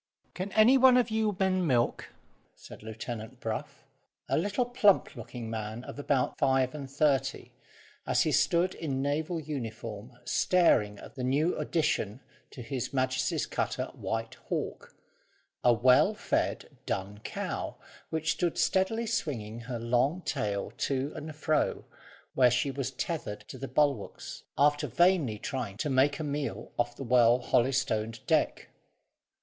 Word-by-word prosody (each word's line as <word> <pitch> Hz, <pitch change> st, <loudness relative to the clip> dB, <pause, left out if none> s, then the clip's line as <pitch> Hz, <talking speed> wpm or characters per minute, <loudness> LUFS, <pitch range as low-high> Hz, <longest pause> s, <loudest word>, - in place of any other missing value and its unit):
"Can 190 Hz, +2 st, -4 dB
any 240 Hz, +5 st, +6 dB
one 255 Hz, -1 st, +7 dB
of 240 Hz, -2 st, +2 dB
you 215 Hz, -3 st, 0 dB
men 185 Hz, -2 st, +2 dB
milk?" 120 Hz, -4 st, +1 dB, 0.5 s
said -, -, -12 dB
Lieutenant 110 Hz, +2 st, -7 dB
Brough, 110 Hz, -2 st, -3 dB, 0.6 s
a -, -, +1 dB
little 205 Hz, +8 st, +1 dB
plump 210 Hz, -9 st, +3 dB
looking 120 Hz, 0 st, -7 dB
man, 110 Hz, +1 st, -5 dB
of -, -, -8 dB
about 140 Hz, -3 st, 0 dB
five 130 Hz, -2 st, +2 dB
and 140 Hz, -3 st, -7 dB
thirty, 135 Hz, -1 st, 0 dB, 0.6 s
as -, -, +3 dB
he -, -, 0 dB
stood 175 Hz, +2 st, +3 dB
in 135 Hz, -4 st, -3 dB
naval 155 Hz, +4 st, -1 dB
uniform 115 Hz, -5 st, -6 dB
staring 105 Hz, -, +3 dB
at -, -, -11 dB
the 130 Hz, -, -5 dB
new 145 Hz, +7 st, +2 dB
addition 150 Hz, -, 0 dB, 0.3 s
to 125 Hz, -, -9 dB
His 120 Hz, +1 st, -3 dB
Majesty's 130 Hz, -1 st, 0 dB
cutter -, -, -2 dB
White 115 Hz, 0 st, -3 dB, 0.2 s
Hawk, -, -, -4 dB, 0.7 s
a 120 Hz, -, +6 dB
well 125 Hz, +2 st, +5 dB
fed -, -, -2 dB
dun 100 Hz, +2 st, -3 dB
cow, -, -, -4 dB, 0.3 s
which 160 Hz, -1 st, 0 dB
stood 175 Hz, +3 st, -1 dB
steadily 225 Hz, +5 st, +1 dB
swinging 120 Hz, -, -3 dB
her 120 Hz, +1 st, -5 dB
long 125 Hz, +9 st, +1 dB
tail 100 Hz, -1 st, -2 dB
to 140 Hz, +2 st, -1 dB
and 155 Hz, -1 st, -7 dB
fro, 155 Hz, 0 st, 0 dB, 0.5 s
where 125 Hz, -2 st, +5 dB
she 125 Hz, +3 st, +1 dB
was 135 Hz, -1 st, -3 dB
tethered 135 Hz, -7 st, -4 dB
to -, -, -8 dB
the 135 Hz, -, -4 dB
bulwarks, 140 Hz, -9 st, -1 dB, 0.2 s
after 145 Hz, +1 st, +3 dB
vainly 155 Hz, -, +3 dB
trying 115 Hz, -4 st, -4 dB
to 145 Hz, +5 st, -1 dB
make 135 Hz, +2 st, +3 dB
a 155 Hz, -, -4 dB
meal 145 Hz, -1 st, -3 dB
off 120 Hz, 0 st, 0 dB
the 135 Hz, -, -6 dB
well 120 Hz, -1 st, +5 dB
holystoned 120 Hz, -3 st, 0 dB
deck. -, -, +1 dB
135 Hz, 145 wpm, -29 LUFS, 120-160 Hz, 0.7 s, one